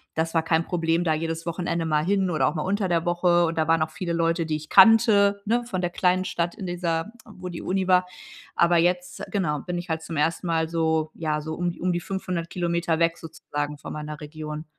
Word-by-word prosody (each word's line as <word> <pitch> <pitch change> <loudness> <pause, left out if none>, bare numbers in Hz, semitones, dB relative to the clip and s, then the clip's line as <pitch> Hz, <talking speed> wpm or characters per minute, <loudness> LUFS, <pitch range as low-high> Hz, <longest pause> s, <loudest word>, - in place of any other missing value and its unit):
das 165 +1 -1
war 165 -1 +2
kein 165 0 +1
Problem 170 0 0
da 160 - +2
jedes 165 +1 -3
Wochenende 170 -1 -2
mal 155 -1 +1
hin 190 0 +1
oder 155 -6 +1
auch 150 - 0
mal 150 - -2
unter 195 0 0
der 170 -1 +1
Woche 175 0 +3
und 165 0 -3
da 160 0 +1
waren 165 -1 +4
auch 155 - -4
viele 170 +2 -5
Leute, 165 0 +1
die 155 -1 -1
ich 155 0 -10
kannte, 200 -1 +6
ne, 240 +3 +1
von 190 -6 -4
der 175 -1 -1
kleinen 185 +1 +1
Stadt 170 0 -2
in 190 - -7
dieser 175 +2 -2
wo 185 -4 -9
die 175 -2 -6
Uni 190 0 -1
war, 180 0 +4 0.5
aber 170 0 +4
jetzt 180 +2 0
genau 155 -8 0
bin 175 -1 -4
ich 175 +2 -5
halt 160 -1 -2
zum 160 -2 -5
1. 165 +3 0
Mal 160 -1 +1
so 160 -1 0
ja 155 -2 -2
so 155 +1 -5
um 175 0 -1
d - - -13
um 180 0 0
die 175 - -2
500km 170 -3 -2
weg 165 0 +2
sozusagen 150 -3 -5
von - - -8
meiner 150 0 -6
Region. 155 +1 -7
170 Hz, 230 wpm, -25 LUFS, 160-180 Hz, 0.5 s, kannte